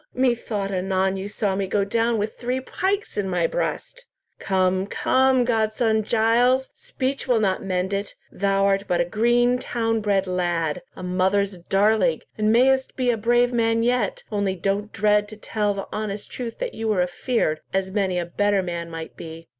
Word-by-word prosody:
Methought 235 Hz, -6 st, 0 dB
anon 190 Hz, 0 st, 0 dB
you 195 Hz, +1 st, -5 dB
saw 205 Hz, -2 st, -1 dB
me 195 Hz, 0 st, -1 dB
go 200 Hz, +1 st, +1 dB
down 230 Hz, +3 st, +1 dB
with 210 Hz, +1 st, -2 dB
three 250 Hz, +1 st, -2 dB
pikes 385 Hz, -, -2 dB
in 195 Hz, -2 st, -1 dB
my 175 Hz, -2 st, +1 dB
breast. -, -, -3 dB, 0.3 s
Come, 185 Hz, 0 st, +1 dB
come, 260 Hz, +2 st, +2 dB
godson 220 Hz, -1 st, +1 dB
Giles, 240 Hz, +4 st, +2 dB
speech 265 Hz, +1 st, -4 dB
will 245 Hz, -3 st, +3 dB
not 195 Hz, -3 st, 0 dB
mend 185 Hz, 0 st, -1 dB
it! 200 Hz, +1 st, -3 dB, 0.2 s
Thou 195 Hz, 0 st, +1 dB
art 195 Hz, 0 st, +1 dB
but 175 Hz, -, +1 dB
a 175 Hz, -, +2 dB
green, 240 Hz, +5 st, +2 dB
town 225 Hz, -3 st, -1 dB
bred 200 Hz, -2 st, +1 dB
lad, 175 Hz, -4 st, -1 dB
a -, -, -9 dB
mother's 190 Hz, +1 st, 0 dB
darling, 195 Hz, -2 st, +2 dB
and 215 Hz, 0 st, +1 dB
mayst 265 Hz, +3 st, +3 dB
be 250 Hz, -2 st, +1 dB
a -, -, 0 dB
brave 240 Hz, +2 st, +2 dB
man 230 Hz, -1 st, +2 dB
yet, 240 Hz, -4 st, 0 dB
only 200 Hz, -2 st, 0 dB
don't 200 Hz, +3 st, -2 dB
dread 210 Hz, 0 st, +2 dB
to 215 Hz, 0 st, -11 dB
tell 210 Hz, -1 st, -1 dB
the 195 Hz, -, -5 dB
honest 210 Hz, -1 st, -4 dB
truth 235 Hz, -2 st, -5 dB
that -, -, -4 dB
you 225 Hz, 0 st, -4 dB
were 200 Hz, -5 st, +2 dB
afeard, 180 Hz, -3 st, -1 dB
as 190 Hz, 0 st, -1 dB
many 190 Hz, -3 st, 0 dB
a 175 Hz, -, -1 dB
better 200 Hz, +2 st, +1 dB
man 170 Hz, -1 st, -4 dB
might 165 Hz, -1 st, -7 dB
be." 165 Hz, 0 st, -10 dB
205 Hz, 180 wpm, -23 LUFS, 190-235 Hz, 0.3 s, will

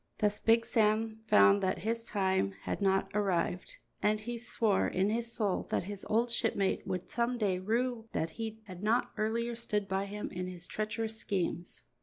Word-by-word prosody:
Thus 210 Hz, -1 st, +1 dB
Big 230 Hz, 0 st, +4 dB
Sam 220 Hz, 0 st, +2 dB
found 100 Hz, -, +6 dB
that 185 Hz, -, +1 dB
his 230 Hz, +3 st, -2 dB
time 190 Hz, -, +1 dB
had -, -, -3 dB
not 195 Hz, 0 st, +2 dB
arrived, 185 Hz, -3 st, 0 dB, 0.2 s
and 210 Hz, 0 st, +2 dB
he 235 Hz, +2 st, -5 dB
swore 225 Hz, -3 st, +1 dB
in 195 Hz, +3 st, +1 dB
his 230 Hz, +1 st, -1 dB
soul 205 Hz, -5 st, 0 dB
that -, -, 0 dB
his 200 Hz, +1 st, -6 dB
old 235 Hz, +2 st, +2 dB
shipmate 210 Hz, -5 st, 0 dB
would 180 Hz, -1 st, -3 dB
some 240 Hz, +1 st, 0 dB
day 195 Hz, -5 st, +1 dB
rue 230 Hz, +3 st, -1 dB
that 160 Hz, 0 st, -1 dB
he 220 Hz, +1 st, -5 dB
had 185 Hz, -4 st, -10 dB
not 220 Hz, +3 st, +2 dB
earlier 230 Hz, +2 st, 0 dB
stood 210 Hz, -3 st, -1 dB
by 195 Hz, +1 st, -1 dB
him 210 Hz, +1 st, -5 dB
in 180 Hz, 0 st, -4 dB
his 180 Hz, -1 st, -6 dB
treacherous 220 Hz, +2 st, -3 dB
schemes. 180 Hz, -2 st, -3 dB
210 Hz, 180 wpm, -32 LUFS, 190-225 Hz, 0.2 s, found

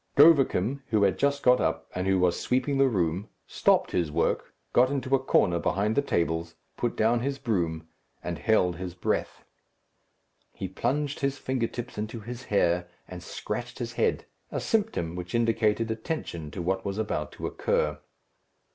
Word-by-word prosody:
Govicum, 140 Hz, -, +5 dB
who 110 Hz, -3 st, +2 dB
had 95 Hz, -, +2 dB
just 140 Hz, 0 st, +1 dB
got 125 Hz, 0 st, +5 dB
up, -, -, -1 dB
and 90 Hz, +1 st, -2 dB
who 95 Hz, 0 st, +3 dB
was 90 Hz, -1 st, +2 dB
sweeping 135 Hz, +2 st, 0 dB
the 135 Hz, -, +6 dB
room, 90 Hz, -4 st, 0 dB, 0.2 s
stopped -, -, +2 dB
his 85 Hz, -4 st, 0 dB
work, 85 Hz, +2 st, -1 dB, 0.2 s
got 125 Hz, +1 st, +5 dB
into 135 Hz, -1 st, -2 dB
a 135 Hz, -, +5 dB
corner 90 Hz, -9 st, +2 dB
behind 105 Hz, +5 st, 0 dB
the -, -, +4 dB
tables, 85 Hz, -8 st, -1 dB, 0.2 s
put 120 Hz, -, -1 dB
down 115 Hz, +2 st, +3 dB
his 135 Hz, +3 st, -2 dB
broom, 85 Hz, -, -1 dB, 0.4 s
and 85 Hz, -3 st, -4 dB
held 90 Hz, -5 st, +2 dB
his 90 Hz, -1 st, -6 dB
breath. 90 Hz, -, -2 dB, 1.1 s
He 95 Hz, -, -4 dB
plunged 140 Hz, +9 st, -1 dB
his 140 Hz, 0 st, 0 dB
fingers 120 Hz, -3 st, -3 dB
into 110 Hz, +2 st, -4 dB
his 120 Hz, +3 st, -7 dB
hair, 90 Hz, -4 st, +2 dB, 0.2 s
and -, -, -8 dB
scratched -, -, -5 dB
his -, -, -4 dB
head, -, -, 0 dB, 0.3 s
a -, -, -2 dB
symptom 205 Hz, -, 0 dB
which 90 Hz, +4 st, -5 dB
indicated 115 Hz, -1 st, +2 dB
attention 110 Hz, -, -4 dB
to 85 Hz, +3 st, -5 dB
what 95 Hz, +2 st, 0 dB
was 100 Hz, 0 st, -3 dB
about 105 Hz, -8 st, -2 dB
to -, -, -6 dB
occur. 75 Hz, -1 st, 0 dB
110 Hz, 165 wpm, -27 LUFS, 90-130 Hz, 1.1 s, the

